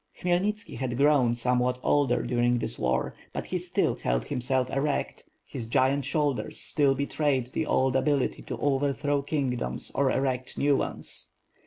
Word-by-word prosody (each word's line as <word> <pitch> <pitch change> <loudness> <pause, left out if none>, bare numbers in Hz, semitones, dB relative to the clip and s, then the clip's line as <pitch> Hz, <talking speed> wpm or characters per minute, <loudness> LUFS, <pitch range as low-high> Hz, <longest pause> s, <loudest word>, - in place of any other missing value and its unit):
Khmyelnitski 195 +5 -1
had 125 -2 -2
grown 140 -4 +4
somewhat 125 +1 +1
older 125 -5 +2
during 120 0 +2
this - - -4
war, 65 0 0 0.2
but - - -4
he - - -2
still - - 0
held - - -1
himself 125 +1 0
erect, 140 +1 -1 0.2
his 115 - -6
giant 130 +3 +2
shoulders 145 -2 -1
still 140 -3 +2
betrayed 140 -2 0
the 155 - -1
old 130 0 +2
ability 140 0 +1
to - - -6
overthrow 145 0 +1
kingdoms 135 - -2
or 140 -1 +2
erect 130 -1 -1
new 145 0 +3
ones. - - -4
135 Hz, 150 wpm, -27 LUFS, 125-145 Hz, 0.2 s, grown